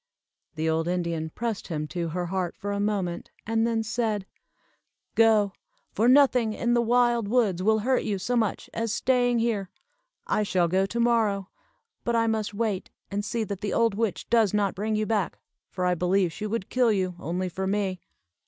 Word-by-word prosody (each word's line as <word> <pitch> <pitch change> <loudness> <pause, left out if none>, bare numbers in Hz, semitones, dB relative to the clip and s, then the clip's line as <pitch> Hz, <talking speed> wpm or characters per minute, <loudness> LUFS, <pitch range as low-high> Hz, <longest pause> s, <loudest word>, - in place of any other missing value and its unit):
The 160 +1 -1
old 160 +1 +1
Indian 170 -3 -1
pressed 225 +4 -4
him 155 -3 -3
to 170 -2 -2
her 175 +2 -2
heart 180 -1 -2
for 205 +1 -4
a 200 - -2
moment, 200 -4 -2 0.2
and 225 +1 +1
then 225 -1 0
said, 220 -3 -1 0.9
"Go! 215 -3 +4 0.4
for 225 - +1
nothing 250 -4 +5
in 240 +2 0
the 240 - +4
wild 240 -1 +2
woods 210 -6 +2
will 220 +3 +3
hurt 250 +4 +1
you 205 -2 -2
so 240 +6 -2
much 220 -4 0
as 230 -1 -2
staying 245 +1 +2
here. 225 -5 0 0.6
I - - +1
shall 185 -4 +2
go 190 +3 +1
to 235 +4 -3
morrow, 220 -5 +2 0.5
but 235 - 0
I 230 0 +3
must 220 -2 -1
wait 210 -2 -2 0.2
and 205 +1 -1
see 225 +3 -2
that 200 -2 -5
the 205 - -2
old 230 -2 +3
witch 215 -2 -2
does 220 -4 +3
not 200 -2 +1
bring 215 +3 -2
you 215 0 0
back, 210 -3 -1 0.3
for 180 -1 -3
I 180 - +3
believe 180 0 +1
she 215 - -4
would 210 -2 -3
kill 250 -3 +3
you, 185 -3 0
only 180 +3 -2
for 190 +2 -3
me." 195 -2 -1
210 Hz, 190 wpm, -26 LUFS, 185-230 Hz, 0.9 s, nothing